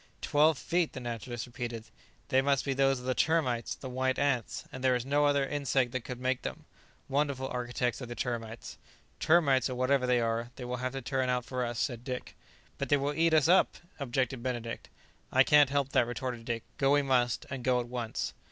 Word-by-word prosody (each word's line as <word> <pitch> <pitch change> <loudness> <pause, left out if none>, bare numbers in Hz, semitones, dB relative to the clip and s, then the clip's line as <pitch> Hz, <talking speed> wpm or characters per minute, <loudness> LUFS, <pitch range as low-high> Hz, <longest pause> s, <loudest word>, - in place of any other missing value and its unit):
"Twelve 150 +1 +4
feet!" 170 +2 0
the 130 - -5
naturalist 120 0 -5
repeated; 120 -2 -5 0.5
"they 130 -2 +4
must 140 -1 +1
be 135 - 0
those 135 0 +3
of 125 - -9
the 130 - +1
termites, 130 -7 +1
the 130 - -8
white 130 +1 0
ants; 140 -4 0
there 130 -1 +2
is 125 0 -2
no 145 +2 +2
other 140 -1 +2
insect 135 -3 0
that 130 0 -2
could 125 0 -6
make 130 0 0
them. - - -6 0.4
Wonderful 140 -1 0
architects 125 0 -2
are 125 - -5
the 120 - -6
termites." 115 -2 -5 0.4
"Termites, 140 -6 +4
or 130 - -3
whatever 130 +1 +2
they 125 -1 +3
are, 115 0 -1
they 125 - -7
will 125 0 -3
have 130 +1 -3
to 135 -1 -5
turn 130 0 0
out 125 -1 0
for 125 -1 -2
us," 120 -1 -3
said 120 -1 -2
Dick. 125 -1 -5 0.4
"But - - -2
they 145 - +5
will 140 +1 -1
eat 160 +1 +3
us 155 -1 +4
up!" 185 +2 +4 0.2
objected 130 -2 -1
Benedict. 120 -2 -4 0.4
"I - - +6
can't 145 -2 +6
help 140 -1 0
that," 120 -3 +3
retorted 120 -1 -4
Dick; 115 -1 -2 0.2
"go 135 0 +4
we 145 0 +4
must, 125 -3 +1
and 135 -3 -4
go 125 -1 +3
at 120 - -4
once." 120 -2 -3
130 Hz, 210 wpm, -30 LUFS, 120-140 Hz, 0.5 s, I